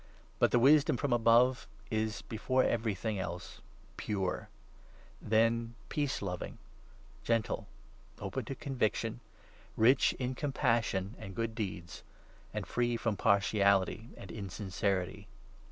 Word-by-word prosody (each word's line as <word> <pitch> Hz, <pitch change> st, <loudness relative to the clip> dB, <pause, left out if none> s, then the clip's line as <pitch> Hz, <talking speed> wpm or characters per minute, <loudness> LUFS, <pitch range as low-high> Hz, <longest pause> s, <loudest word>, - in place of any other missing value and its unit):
But -, -, +5 dB
the -, -, +3 dB
wisdom 140 Hz, +1 st, +5 dB
from 140 Hz, 0 st, 0 dB
above 120 Hz, +2 st, +4 dB, 0.2 s
is, 110 Hz, -1 st, -1 dB
before 130 Hz, +4 st, +1 dB
every 115 Hz, -3 st, 0 dB
thing 105 Hz, +2 st, -2 dB
17 -, -, -1 dB
else, 90 Hz, -1 st, -6 dB, 0.4 s
pure; 95 Hz, -3 st, -2 dB, 0.7 s
then 115 Hz, +2 st, +2 dB
peace 145 Hz, -7 st, -1 dB
loving, 90 Hz, -2 st, -4 dB, 0.7 s
gentle, 115 Hz, -2 st, 0 dB, 0.5 s
open -, -, -4 dB
to 135 Hz, -, -5 dB
conviction, 125 Hz, -, -1 dB, 0.6 s
rich 120 Hz, +5 st, +5 dB
in 125 Hz, 0 st, -3 dB
compassion 115 Hz, -8 st, 0 dB
and 95 Hz, -4 st, -8 dB
good 115 Hz, -1 st, -2 dB
deeds, 95 Hz, -6 st, -5 dB, 0.5 s
and -, -, -4 dB
free 120 Hz, -1 st, 0 dB
from 115 Hz, -2 st, -1 dB
partiality 100 Hz, +1 st, +2 dB
and 95 Hz, -, -9 dB
insincerity. 100 Hz, -1 st, -2 dB
110 Hz, 120 wpm, -32 LUFS, 100-120 Hz, 0.7 s, But